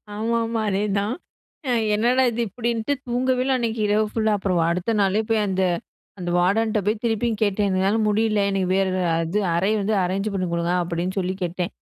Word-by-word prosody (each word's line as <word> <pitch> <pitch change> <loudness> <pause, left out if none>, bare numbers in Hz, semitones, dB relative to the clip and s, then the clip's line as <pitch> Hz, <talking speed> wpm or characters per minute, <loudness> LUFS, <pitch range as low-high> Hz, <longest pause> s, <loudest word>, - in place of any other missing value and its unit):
ஆமாமா 230 +1 -1
அதேதான். 200 +2 0 0.8
என்னடா 245 +5 +3
இது? 235 - -5
இப்படின்ட்டு 235 +3 -1
தூங்கவே 250 +1 +1
இல்ல 265 0 +2
அன்னைக்கு 230 -1 -2
இரவு 210 +1 +2
ஃபுல்லா. 220 -1 +1
அப்புறம் 185 -3 0
அடுத்த 180 +6 -1
நாளே 200 +2 +2
போய் 225 -1 +2
அந்த, 190 -1 0 0.6
அந்த 175 -1 -3
வார்டன்ட்ட 215 +4 +2
போய் 210 +1 0
திருப்பியும் 225 -1 0
கேட்டேன். 205 0 +1
"என்னால 190 +4 +1
முடியல 215 0 +2
எனக்கு 190 -2 0
வேற 195 0 +2 0.3
அது 165 +5 -1 0.2
அறை 190 +5 +1
வந்து 210 +2 0
அரேஞ்ச் 195 +4 -2
பண்ணி 185 -2 -1
குடுங்க" 170 +1 0
அப்டின்னு 175 +3 -3
சொல்லி 185 0 -2
கேட்டேன். 180 +2 -3
210 Hz, 165 wpm, -23 LUFS, 190-225 Hz, 0.8 s, என்னடா